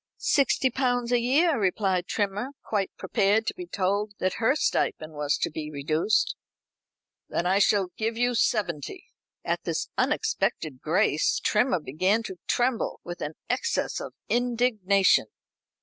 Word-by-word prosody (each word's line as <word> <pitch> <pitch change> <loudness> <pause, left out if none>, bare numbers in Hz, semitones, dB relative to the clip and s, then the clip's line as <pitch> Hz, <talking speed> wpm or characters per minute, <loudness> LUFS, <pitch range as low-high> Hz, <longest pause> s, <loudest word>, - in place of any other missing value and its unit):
"Sixty 270 -2 +2
pounds 245 -1 0
a 245 - +4
year," 280 +5 +3
replied 190 -2 0
Trimmer, 210 +6 -2
quite 200 -3 -1
prepared 205 +2 +1
to - - -1
be 360 -1 -8
told 200 - -1
that 185 0 -1
her 225 +5 +3
stipend 155 - -1
was 145 -1 0
to - - -1
be 155 0 -5
reduced. 155 +7 0 0.9
"Then 170 - -1
I 190 +2 +3
shall 200 -2 +3
give 225 +1 -2
you 245 +1 +2
seventy." 185 - -1 0.4
At - - -1
this - - -2
unexpected 140 -5 -1
grace 180 - +2
Trimmer 245 -8 +2
began 185 +10 0
to 190 -4 -7
tremble 245 -2 0
with 175 0 -7
an 150 +1 -4
excess 465 +1 -1
of - - -8
indignation. 230 -5 +2
205 Hz, 140 wpm, -26 LUFS, 180-245 Hz, 0.9 s, a